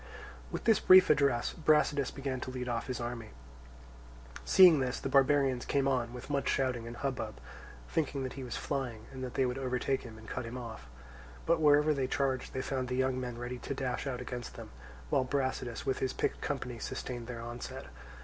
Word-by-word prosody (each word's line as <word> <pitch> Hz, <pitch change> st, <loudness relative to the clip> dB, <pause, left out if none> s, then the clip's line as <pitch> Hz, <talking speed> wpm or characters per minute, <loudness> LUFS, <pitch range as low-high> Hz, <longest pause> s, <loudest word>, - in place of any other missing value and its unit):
With -, -, -5 dB
this 225 Hz, -3 st, +4 dB
brief 185 Hz, -2 st, +8 dB
address 140 Hz, -5 st, +2 dB
Brasidas 150 Hz, -3 st, +2 dB
began 135 Hz, -2 st, -4 dB
to -, -, -4 dB
lead 125 Hz, -1 st, -4 dB
off 120 Hz, -2 st, -2 dB
his 130 Hz, -, -3 dB
army. 120 Hz, -1 st, -5 dB, 1.1 s
Seeing 180 Hz, -5 st, +7 dB
this, 125 Hz, -1 st, -1 dB
the -, -, -3 dB
barbarians 135 Hz, -2 st, +3 dB
came 140 Hz, -1 st, +1 dB
on 125 Hz, -3 st, 0 dB
with 125 Hz, 0 st, -8 dB
much 140 Hz, -1 st, 0 dB
shouting 125 Hz, -4 st, 0 dB
and 120 Hz, 0 st, -7 dB
hubbub, 125 Hz, -6 st, -3 dB, 0.5 s
thinking 145 Hz, -3 st, -1 dB
that 130 Hz, -, -4 dB
he 135 Hz, -, -7 dB
was 125 Hz, -, -4 dB
flying 120 Hz, -6 st, -3 dB
and 130 Hz, -1 st, -7 dB
that 125 Hz, -, -5 dB
they 135 Hz, -, +3 dB
would 125 Hz, +1 st, -2 dB
overtake 130 Hz, +1 st, 0 dB
him 110 Hz, -3 st, -10 dB
and 110 Hz, 0 st, -13 dB
cut 130 Hz, -, -4 dB
him 115 Hz, +2 st, -6 dB
off. 115 Hz, -, -8 dB, 0.6 s
But 165 Hz, 0 st, +2 dB
wherever 150 Hz, 0 st, +5 dB
they 135 Hz, -3 st, -1 dB
charged 130 Hz, -1 st, -1 dB
they 130 Hz, -, -1 dB
found 130 Hz, -2 st, -2 dB
the 125 Hz, -, -2 dB
young 130 Hz, 0 st, +1 dB
men 125 Hz, -2 st, -4 dB
ready 120 Hz, +1 st, -5 dB
to 140 Hz, -, -4 dB
dash 130 Hz, 0 st, -2 dB
out 125 Hz, -2 st, -3 dB
against 125 Hz, -1 st, -6 dB
them, -, -, -9 dB, 0.4 s
while -, -, +3 dB
Brasidas 130 Hz, -3 st, -2 dB
with 135 Hz, -1 st, 0 dB
his 130 Hz, -, -1 dB
picked -, -, -1 dB
company 125 Hz, -6 st, -3 dB
sustained 120 Hz, 0 st, -5 dB
their 120 Hz, -2 st, -6 dB
onset. 120 Hz, +1 st, -6 dB
130 Hz, 200 wpm, -32 LUFS, 120-140 Hz, 1.1 s, brief